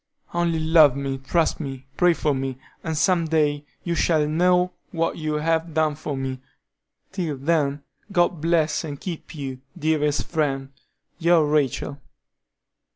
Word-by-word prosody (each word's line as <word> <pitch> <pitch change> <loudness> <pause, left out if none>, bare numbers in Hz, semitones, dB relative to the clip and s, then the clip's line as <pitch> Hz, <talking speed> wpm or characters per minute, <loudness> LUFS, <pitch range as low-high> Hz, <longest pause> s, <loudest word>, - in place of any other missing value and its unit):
Only 170 -1 +1
love 155 -4 +6
me, 135 -1 -3
trust 160 +5 +1
me, 135 -4 -6
pray 180 -1 +4
for 150 -2 +1
me, 135 -1 -3 0.3
and 160 -1 -2
some 175 0 +3
day 150 -2 +1 0.2
you 170 - -1
shall 160 -3 +2
know 180 +3 +3 0.2
what 165 -1 -1
you 155 -1 -2
have 160 +1 0
done 155 -1 +2
for 145 -1 -5
me. 130 -1 -3 0.7
Till 170 -7 -3
then, 145 -1 0 0.3
God 175 -4 +2
bless 160 -2 +2
and 145 -3 -6
keep 170 -2 -7
you, 135 -3 -5 0.2
dearest 150 -1 +1
friend, 135 -5 -1 0.5
your 170 -2 +4
RACHEL." 145 -1 0
155 Hz, 145 wpm, -24 LUFS, 140-165 Hz, 0.7 s, love